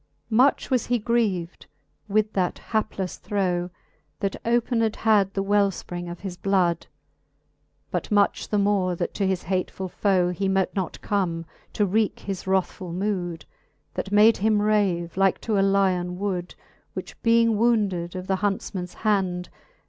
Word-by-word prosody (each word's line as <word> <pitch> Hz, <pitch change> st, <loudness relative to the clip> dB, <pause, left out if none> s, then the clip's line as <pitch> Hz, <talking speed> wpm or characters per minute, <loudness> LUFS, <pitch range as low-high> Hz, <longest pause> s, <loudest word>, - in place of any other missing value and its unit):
XXXV. 145 Hz, +9 st, -40 dB
Much 265 Hz, +4 st, +3 dB
was 250 Hz, -3 st, +2 dB
he 245 Hz, -, +2 dB
grieved 210 Hz, -7 st, -1 dB, 0.4 s
with 215 Hz, +1 st, +1 dB
that 180 Hz, -2 st, 0 dB
haplefle 215 Hz, -4 st, -2 dB
throe. 180 Hz, -3 st, -1 dB, 0.5 s
That 195 Hz, -1 st, -1 dB
opened 230 Hz, -1 st, +1 dB
had 210 Hz, -3 st, +3 dB
the 195 Hz, -, 0 dB
welfpring 195 Hz, -3 st, 0 dB
of 175 Hz, 0 st, -8 dB
his 190 Hz, -3 st, -6 dB
blood; 185 Hz, -4 st, +1 dB, 1.0 s
But -, -, -2 dB
much 205 Hz, -1 st, +2 dB
the 210 Hz, -, +1 dB
more, 200 Hz, -3 st, +2 dB
that -, -, -3 dB
to 195 Hz, -, 0 dB
his 190 Hz, -2 st, -1 dB
hatefull 185 Hz, 0 st, -2 dB
foe 185 Hz, -3 st, +2 dB
He 195 Hz, +3 st, -1 dB
mote 190 Hz, -1 st, +1 dB
not 190 Hz, -4 st, -3 dB
come, 170 Hz, -5 st, -1 dB, 0.3 s
to 210 Hz, -, +2 dB
wrcake 210 Hz, +2 st, 0 dB
his 195 Hz, -2 st, -5 dB
wrathfull 185 Hz, -2 st, -1 dB
mood. 180 Hz, -5 st, -2 dB, 0.5 s
That 195 Hz, -, -4 dB
made 215 Hz, +2 st, +6 dB
him 215 Hz, +1 st, +2 dB
rave, 200 Hz, -5 st, +1 dB
like 195 Hz, -1 st, +3 dB
to 215 Hz, -3 st, 0 dB
a -, -, +4 dB
lyon 190 Hz, -2 st, +2 dB
wood. 185 Hz, -3 st, -3 dB, 0.4 s
Which -, -, -8 dB
being 230 Hz, -1 st, +4 dB
wounded 200 Hz, -7 st, +1 dB
of 185 Hz, 0 st, -5 dB
the 190 Hz, 0 st, 0 dB
huntfman's 190 Hz, -2 st, -3 dB
hand. 185 Hz, -4 st, +1 dB
195 Hz, 155 wpm, -25 LUFS, 180-210 Hz, 1.0 s, made